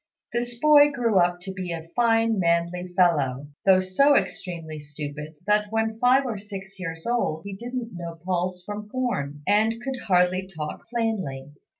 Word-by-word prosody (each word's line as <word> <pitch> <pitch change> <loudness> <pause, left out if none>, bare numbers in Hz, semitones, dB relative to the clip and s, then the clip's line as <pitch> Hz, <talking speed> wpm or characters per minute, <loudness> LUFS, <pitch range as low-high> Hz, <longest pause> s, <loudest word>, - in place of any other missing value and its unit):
This 240 0 -2
boy 295 +2 +7
grew 235 -8 +2
up 175 0 +2
to 190 +1 -6
be 185 -2 -5
a 165 -1 -5
fine 225 -2 +3
manly 170 +1 +1
fellow, 145 -6 +2 0.2
though 190 -1 +7
so 275 +11 +4
extremely 165 - -2
stupid 150 +1 -7
that 210 +1 +2
when 225 0 -1
five 255 +3 +4
or 230 -4 -3
six 195 -1 -8
years 165 -3 -5
old 235 -10 0
he 200 - -5
didn't 240 +2 -5
know 170 -1 -7
pulse 180 0 -1
from 210 +1 -6
corn, 145 - -2
and 215 +2 +4
could 260 +1 -4
hardly 185 0 +3
talk 150 -1 -5
plainly. 190 - -2
190 Hz, 165 wpm, -25 LUFS, 170-230 Hz, 0.2 s, boy